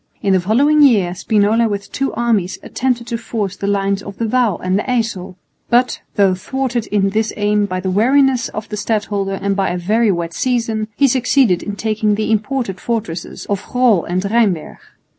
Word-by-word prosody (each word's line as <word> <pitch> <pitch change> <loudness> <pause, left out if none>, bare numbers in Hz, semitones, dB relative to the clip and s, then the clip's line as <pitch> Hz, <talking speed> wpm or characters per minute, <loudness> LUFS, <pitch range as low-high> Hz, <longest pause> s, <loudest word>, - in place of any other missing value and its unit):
In 195 - +2
the 190 - +4
following 275 +11 +3
year 205 -11 +4
Spinola 215 +4 +2
with 200 -1 -5
two 275 +1 -1
armies 220 -6 0
attempted 245 -2 -2
to 235 -1 -4
force 215 -4 -3
the 200 - -4
lines 200 0 0
of 200 -1 -9
the 230 - -1
Waal 235 -5 +1
and 185 +2 0
the - - -2
Yssel, 220 -7 -2 0.3
but, 245 +1 +2
though 195 -2 +4
thwarted 245 +4 -3
in 195 -1 +1
this 220 +1 0
aim 205 0 +1
by 185 -1 -3
the 190 0 -2
wariness 255 +4 +3
of 215 +1 -6
the 210 - -4
stadholder 200 -2 -1
and 200 0 0
by 195 -1 0
a 175 - -2
very 215 +5 +2
wet 170 -2 -3
season, 230 0 -1
he 275 - +4
succeeded 245 -6 +2
in 205 - -5
taking 215 0 0
the 215 +1 -1
important 220 -2 -1
fortresses 210 -8 -4
of 200 -1 -2
Groll 245 -8 +2
and 180 +1 -1
Rheinberg. 200 -6 0
210 Hz, 190 wpm, -17 LUFS, 195-235 Hz, 0.3 s, the